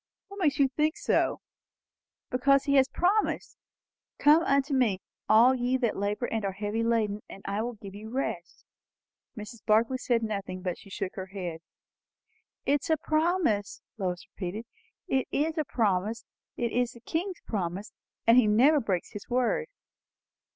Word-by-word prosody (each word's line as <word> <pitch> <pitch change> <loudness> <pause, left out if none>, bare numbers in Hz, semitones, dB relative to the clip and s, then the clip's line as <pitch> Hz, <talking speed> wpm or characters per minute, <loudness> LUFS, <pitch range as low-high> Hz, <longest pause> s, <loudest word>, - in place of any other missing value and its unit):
"What 400 0 -9
makes 295 -6 +2
you 275 - +5
think 300 +4 0
so?" - - +1 0.9
"Because 275 +2 +3
he 280 -1 0
has 270 -1 +5
promised. 395 +8 0 0.6
'Come 300 +3 +6
unto 280 -2 +1
me, 235 -8 +2 0.3
all 235 +4 +7
ye 250 0 +1
that 240 -4 0
labour 205 +4 -1
and 225 -2 -2
are 195 -1 -1
heavy 205 +3 -2
laden, 220 -3 +1
and 195 - -11
I 200 +2 -1
will 240 +1 -3
give 200 -2 -10
you 210 +2 -9
rest.'" 265 +4 -4 0.7
Mrs. 210 +1 -9
Barclay 225 +4 +3
said 240 -2 0
nothing, 195 -4 -4
but 180 -2 -3
she 195 - -15
shook 185 -1 -4
her 190 -1 -6
head. 180 -4 -5 1.1
"It 285 +1 +2
is - - -7
a 320 - +3
promise," 310 - 0 0.2
Lois 180 -2 -2
repeated. 205 +4 -5 0.4
"It 265 -1 +1
is 310 +2 0
a 305 - 0
PROMISE. 215 -1 0 0.3
It 235 -1 -1
is 245 0 0
the 235 - -15
King's 345 - -3
promise; 195 0 -3 0.3
and 230 +2 +6
he 245 -4 +6
never 260 +9 +5
breaks 195 -8 -2
his 205 - -9
word." 255 - +1
235 Hz, 165 wpm, -28 LUFS, 205-275 Hz, 1.1 s, all